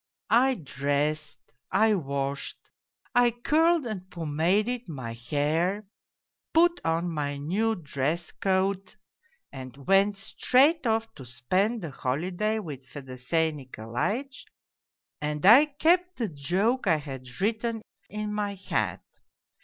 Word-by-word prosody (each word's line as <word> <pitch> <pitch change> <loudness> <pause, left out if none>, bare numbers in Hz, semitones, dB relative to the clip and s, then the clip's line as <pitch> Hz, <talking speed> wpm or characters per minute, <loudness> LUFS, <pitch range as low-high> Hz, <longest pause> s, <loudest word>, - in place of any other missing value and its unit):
I 260 +3 +5
dressed, 145 - -2 0.2
I 220 0 +4
washed, 140 -5 -2 0.6
I 245 0 +5
curled 310 +6 +2
and 190 -5 -5
pomaded 180 +9 0
my 130 -7 -5
hair, 155 - -1 0.7
put 345 +1 +4
on 165 +2 0
my 145 -2 -2
new 200 +10 0
dress 155 +1 -2
coat 195 +1 -1 0.6
and 130 -1 -9
went 195 +1 +4
straight 270 - +3
off 225 0 0
to 135 - -11
spend 185 - 0
the 160 - -5
holiday 175 +12 -1
with 150 -10 -6
Fedosey 135 +4 -2
Nikolaitch, 140 - -4 0.7
and 150 +1 -2
I 240 +9 +9
kept 350 +5 +2
the 230 -4 -2
joke 185 - 0
I 165 - +5
had 130 -4 -8
written 225 +2 -1 0.3
in 210 0 -4
my 205 -1 -2
hat. 185 -1 -2
185 Hz, 115 wpm, -27 LUFS, 145-225 Hz, 0.7 s, I